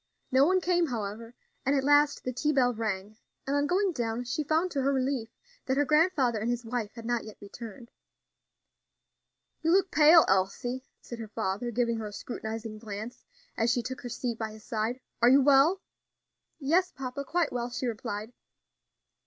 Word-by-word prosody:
No 265 +3 +5
one 370 +1 +3
came, 350 -1 +2
however, 230 -1 -5 0.3
and 275 +2 +2
at 270 - +1
last 290 +1 +4
the 255 - -3
tea 300 +5 0
bell 250 -4 +3
rang, 215 -2 -4 0.3
and 275 - -1
on 285 0 +2
going 380 +4 +2
down 235 -4 -2
she 245 +5 -2
found 320 +5 +1
to 280 - -1
her 275 +1 +2
relief 260 -3 -1 0.4
that 265 0 +1
her 290 - +3
grandfather 300 -7 +3
and 220 +3 -2
his 240 0 -2
wife 225 -2 -3
had 230 -1 -9
not 240 -1 0
yet 215 - -11
returned. 230 +3 -10 1.7
"You 325 - 0
look 380 +2 +3
pale, 315 +2 +7
Elsie," 220 +7 0
said 240 - -8
her 225 - -6
father, 210 +2 -2
giving 235 0 0
her 220 -1 -4
a 205 - -9
scrutinizing 220 -1 -6
glance 215 +2 -7 0.3
as 225 +1 +1
she 245 0 +1
took 260 +2 -6
her 245 - -6
seat 235 -1 -3
by 220 -1 -3
his 215 -1 -13
side. 225 +3 -2 0.2
"Are 240 - +7
you 270 +1 +6
well?" 285 +7 +5 0.8
"Yes, 335 +6 +2
papa, 270 +1 -5
quite 335 +2 0
well," 240 0 -2
she 255 +1 -4
replied. 220 -1 -4
245 Hz, 185 wpm, -29 LUFS, 225-285 Hz, 1.7 s, pale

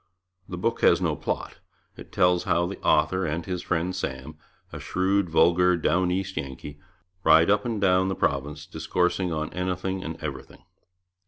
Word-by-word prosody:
The 90 - -5
book 115 +6 -1
has - - +5
no - - 0
plot. - - -4 0.4
It - - -12
tells 90 -1 +2
how 85 -2 +2
the 95 +3 -7
author 95 +5 +2
and 80 +3 -3
his 90 -2 -3
friend 90 +1 -2
Sam, 65 -3 -5 0.4
a - - -6
shrewd 95 0 0
vulgar 90 +2 +4
Down 85 +3 +1
East 95 +1 -3
Yankee, 70 +2 -6 0.4
ride 85 +5 +5
up 105 0 +2
and 115 -3 -2
down 95 -1 +3
the 95 - -2
province 75 -2 -2
discoursing 90 +3 -1
on 80 -1 -3
anything 90 +1 -3
and 80 0 -6
everything. 70 -4 -8
90 Hz, 165 wpm, -25 LUFS, 80-95 Hz, 0.4 s, has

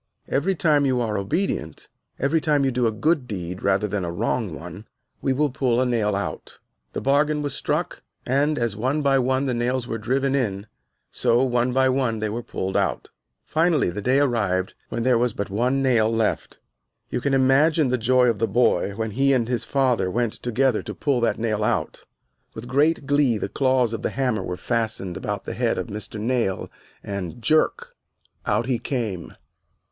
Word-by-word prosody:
Every 180 +8 0
time 150 -4 +3
you 130 -2 +1
are 110 -3 -1
obedient, 100 - -2 0.3
every 150 +4 +1
time 145 -3 +2
you 135 - +2
do 125 -1 +1
a - - +1
good 145 +4 0
deed 90 -4 -5
rather 100 +1 +1
than 100 -1 -2
a 85 - -3
wrong 110 +2 -1
one, 90 +6 -9 0.3
we 135 - +1
will 145 +2 +1
pull 125 -2 +1
a 130 - +2
nail 110 -5 +1
out." 80 -6 -5 0.4
The - - -3
bargain 150 +2 +2
was 145 -2 -3
struck, - - -2 0.2
and 145 +4 +1
as, 115 -4 -1
one 130 +8 -1
by 135 -1 +3
one, 130 +2 +1
the 130 - 0
nails 120 +1 -1
were 115 -1 -3
driven 130 +5 0
in, 105 -7 -1 0.5
so, 120 +2 +2
one 125 -1 +1
by 130 +1 +3
one, 130 -3 +1
they 110 0 -1
were 115 +3 -3
pulled 95 -4 -4
out. - - -1 0.3
Finally 160 - +2
the 105 +4 -5
day 130 +6 +3
arrived 100 -9 0 0.2
when 115 - -2
there 125 -2 +3
was 120 -2 +1
but 100 -1 -4
one 125 +6 +1
nail 115 -4 +3
left. 115 -1 -1 0.5
You - - -1
can 140 +1 +1
imagine 140 +3 +4
the 125 - +1
joy 125 +2 +4
of 115 -4 +1
the 115 - +1
boy 105 -2 +2
when 110 0 -3
he 135 +5 +2
and 120 -3 +1
his 120 -3 -2
father 125 -9 +1
went 120 +3 0
together 125 0 0
to - - -7
pull 140 -5 0
that 115 - +1
nail 110 -2 -1
out. - - -1 0.5
With 110 +2 -7
great 145 +3 +2
glee 140 -4 +2
the - - -3
claws 130 -4 +1
of 115 - -4
the - - -1
hammer 125 -5 -1
were 90 - -4
fastened 110 -5 -2
about - - -4
the - - -5
head - - 0
of - - -4
Mr. 105 +1 -6
Nail 115 -4 -1 0.3
and, 100 +1 -5
jerk, 155 +7 +1 0.5
out 105 +3 +1
he 125 -2 0
came. 110 -11 -4
120 Hz, 195 wpm, -23 LUFS, 110-135 Hz, 0.5 s, imagine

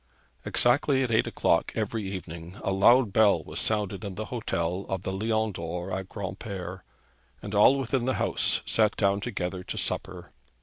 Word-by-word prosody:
Exactly 130 +2 +2
at 125 - -2
eight 110 - +3
o'clock - - +1
every 110 -2 -2
evening 85 -1 -7
a - - 0
loud 110 +3 +5
bell 110 -2 +4
was - - -5
sounded 105 -2 -1
in 100 -3 -5
the 110 - -4
hotel 90 -5 -2
of 95 -1 -2
the 95 - -3
Lion 110 +2 0
d'Or 90 +1 -5
at 95 0 -4
Granpere, 95 -2 -6 0.6
and 100 - -6
all 105 +7 +6
within 130 -1 -1
the 130 - +1
house - - +1
sat 110 -2 +2
down 100 -1 +2
together 95 -5 -3
to - - -6
supper. 90 -2 -3
100 Hz, 170 wpm, -27 LUFS, 95-110 Hz, 0.6 s, all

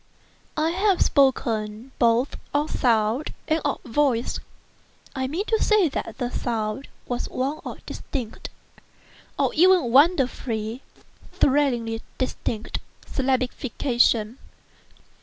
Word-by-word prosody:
I 315 +2 +2
have 385 +1 +2
spoken 230 -3 +1
both 235 +2 +3 0.2
of 295 +1 +1
"sound" 230 +3 +1
and 315 +1 +1
of 285 - -1
"voice." 250 -1 +1 0.8
I 260 -1 -1
mean 340 +9 -2
to 445 -1 +1
say 420 -6 +4
that - - -5
the 245 -2 -2
sound 225 +2 -2 0.2
was 245 -1 -3
one 270 +4 -2
of - - -8
distinct—of 245 -6 -6
even 355 -6 +5
wonderfully, 255 -6 +2 0.5
thrillingly 245 -5 +1 0.2
distinct—syllabification. 250 -1 -1
260 Hz, 95 wpm, -24 LUFS, 230-295 Hz, 0.8 s, even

